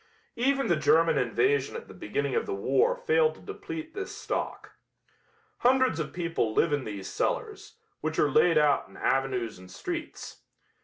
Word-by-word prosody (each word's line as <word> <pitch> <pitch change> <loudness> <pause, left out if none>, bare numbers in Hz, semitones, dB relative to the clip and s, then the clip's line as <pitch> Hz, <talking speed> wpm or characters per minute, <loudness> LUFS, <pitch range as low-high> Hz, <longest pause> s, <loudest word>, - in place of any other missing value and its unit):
Even 275 +3 +1
the 170 - +3
German 165 +2 +4
invasion 430 +3 +1
at 470 0 -7
the - - -12
beginning - - -3
of 460 - 0
the 400 - -2
war 475 +4 +2
failed 475 -1 +2
to - - -16
deplete 350 -6 -7
this 395 -1 -5
stock. - - -4 0.9
Hundreds 255 -7 +3
of 155 - -3
people 165 -11 -1
live 165 - +3
in 145 -3 -1
these 100 -3 -6
cellars, - - -3 0.2
which 155 +1 -3
are 145 - +3
laid 165 +4 +4
out 150 -2 +3
in - - -15
avenues 130 -6 -1
and 90 0 -13
streets. 90 - -6
175 Hz, 165 wpm, -28 LUFS, -, 0.9 s, German